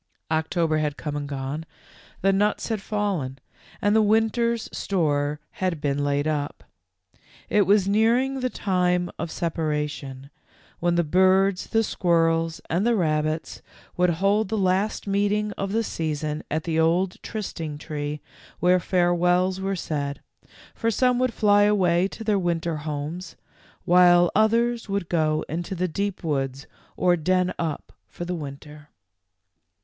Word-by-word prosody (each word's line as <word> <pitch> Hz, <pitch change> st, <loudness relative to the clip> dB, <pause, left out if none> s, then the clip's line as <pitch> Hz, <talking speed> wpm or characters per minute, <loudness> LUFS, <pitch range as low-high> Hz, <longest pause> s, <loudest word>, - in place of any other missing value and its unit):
147 160 Hz, +2 st, -1 dB
October 160 Hz, -2 st, +2 dB
had 150 Hz, -1 st, -2 dB
come 150 Hz, -2 st, -4 dB
and 145 Hz, -1 st, -4 dB
gone, 140 Hz, +2 st, -4 dB, 0.6 s
the 195 Hz, +1 st, +3 dB
nuts 205 Hz, +4 st, +1 dB
had 220 Hz, -2 st, -1 dB
fallen^ 195 Hz, -11 st, -2 dB, 0.5 s
and 205 Hz, +1 st, +3 dB
the 220 Hz, -, +5 dB
winter's 225 Hz, +2 st, +1 dB
store 150 Hz, -5 st, 0 dB
had 185 Hz, -4 st, -2 dB
been 145 Hz, 0 st, -1 dB
laid 145 Hz, +1 st, 0 dB
up. 145 Hz, -2 st, -2 dB, 0.9 s
It 205 Hz, -3 st, +3 dB
was 200 Hz, -1 st, +4 dB
nearing 235 Hz, +6 st, +2 dB
the 255 Hz, 0 st, -1 dB
time 180 Hz, -4 st, 0 dB
of -, -, -3 dB
separation, 150 Hz, -5 st, -3 dB, 0.5 s
when 175 Hz, 0 st, +1 dB
the 170 Hz, -, +3 dB
birds, 185 Hz, +3 st, +3 dB
the 225 Hz, 0 st, +2 dB
squirrels, 165 Hz, -3 st, +1 dB
and 175 Hz, +4 st, 0 dB
the 235 Hz, +1 st, +3 dB
rabbits 155 Hz, -3 st, -1 dB, 0.3 s
would 180 Hz, 0 st, +3 dB
hold 195 Hz, +5 st, +1 dB
the 220 Hz, -, -1 dB
last 195 Hz, +2 st, 0 dB
meeting 205 Hz, +1 st, 0 dB
of 195 Hz, -1 st, -4 dB
the 225 Hz, +2 st, +1 dB
season 155 Hz, -4 st, -3 dB
at 155 Hz, +1 st, -1 dB
the 165 Hz, -1 st, -1 dB
old 175 Hz, +3 st, +1 dB
trysting 165 Hz, -8 st, -5 dB
tree 150 Hz, 0 st, -5 dB, 0.4 s
where 180 Hz, +1 st, +4 dB
farewells 180 Hz, +1 st, +2 dB
were 195 Hz, 0 st, -1 dB
said, 145 Hz, -5 st, -3 dB, 0.5 s
for 230 Hz, -, -1 dB
some 250 Hz, +2 st, +2 dB
would 255 Hz, -1 st, +1 dB
fly 205 Hz, -2 st, +4 dB
away 190 Hz, -4 st, +3 dB
to 225 Hz, -, -9 dB
their 210 Hz, -2 st, +1 dB
winter 170 Hz, -2 st, -1 dB
homes, 150 Hz, +4 st, -5 dB, 0.5 s
while 175 Hz, 0 st, +6 dB
others 230 Hz, +2 st, +2 dB
would 195 Hz, -3 st, -2 dB
go 155 Hz, -2 st, +1 dB
into 170 Hz, +5 st, -4 dB
the 185 Hz, +1 st, 0 dB
deep 200 Hz, +3 st, -3 dB
woods 135 Hz, -3 st, -2 dB, 0.3 s
or 180 Hz, -1 st, +3 dB
den 185 Hz, +2 st, +1 dB
up 160 Hz, -3 st, -4 dB
for 175 Hz, -, -7 dB
the 180 Hz, -, -3 dB
winter. 150 Hz, -1 st, -8 dB
175 Hz, 145 wpm, -24 LUFS, 155-200 Hz, 0.9 s, while